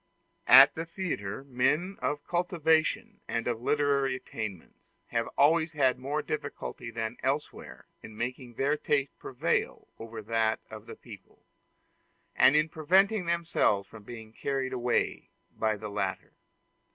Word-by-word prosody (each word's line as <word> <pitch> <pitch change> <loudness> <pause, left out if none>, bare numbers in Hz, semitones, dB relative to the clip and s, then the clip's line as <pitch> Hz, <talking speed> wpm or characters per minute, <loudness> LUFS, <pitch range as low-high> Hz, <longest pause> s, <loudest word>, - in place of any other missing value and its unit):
At - - +9
the 160 - -4
theatre, 150 - -4
men 140 +9 0
of 145 0 -2
cultivation 165 -3 +1
and 115 0 -2
of 120 -2 -2
literary 140 -1 +1
attainments 105 -8 -8
have 115 0 -1
always 160 +3 +4
had 130 -4 +2
more 145 +4 -2
difficulty 145 -5 -5
than 115 +1 -4
elsewhere 140 +3 -3 0.2
in 110 - -11
making 125 +1 -5
their 140 +4 +1
taste 145 -2 -1
prevail 125 - -2
over 115 -1 -8
that 110 0 +1
of - - -10
the - - -8
people, - - -15 0.9
and 145 - +6
in 155 +1 +4
preventing 185 +5 +2
themselves 165 -12 +1
from 115 - -13
being 110 0 -10
carried 135 +1 -2
away 125 -1 -1 0.3
by 110 -1 0
the 105 +1 -7
latter. 100 -2 -3
135 Hz, 135 wpm, -29 LUFS, 115-155 Hz, 0.9 s, At